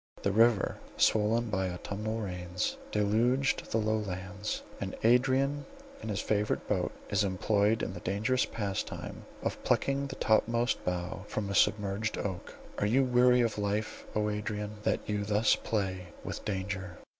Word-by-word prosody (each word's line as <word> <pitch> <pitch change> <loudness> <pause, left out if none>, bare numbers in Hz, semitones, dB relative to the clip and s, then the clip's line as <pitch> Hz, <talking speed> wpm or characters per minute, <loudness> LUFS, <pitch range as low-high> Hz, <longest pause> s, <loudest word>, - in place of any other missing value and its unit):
The 100 - +2
river 110 -1 +3 0.2
swollen 110 +2 +3
by 95 -2 0
autumnal 105 +5 -3
rains, 90 -2 -2 0.2
deluged 115 +6 +2
the - - +2
low 110 0 +1
lands, 100 +1 -4 0.2
and - - -4
Adrian 135 +4 +3 0.4
in 110 - -5
his 100 - -1
favourite 105 0 0
boat - - 0 0.2
is 100 +1 +3
employed 100 +3 +2
in - - -2
the 90 - -6
dangerous 110 +8 +1
pastime 100 -3 -4 0.2
of - - -3
plucking 140 0 +1
the - - -6
topmost 115 +2 +2
bough 90 0 -3
from 100 -2 -3
a - - -1
submerged 105 +1 +2
oak. 95 -3 -4 0.2
Are 105 - +2
you 130 +6 +4
weary 125 0 +5
of 115 -3 0
life, 105 +1 -2
O 105 0 +1
Adrian, 105 0 -3
that - - 0
you 105 -1 -1
thus 105 +2 +3
play 95 -4 -2 0.2
with - - -5
danger? 95 -2 -3
105 Hz, 155 wpm, -31 LUFS, 100-115 Hz, 0.4 s, weary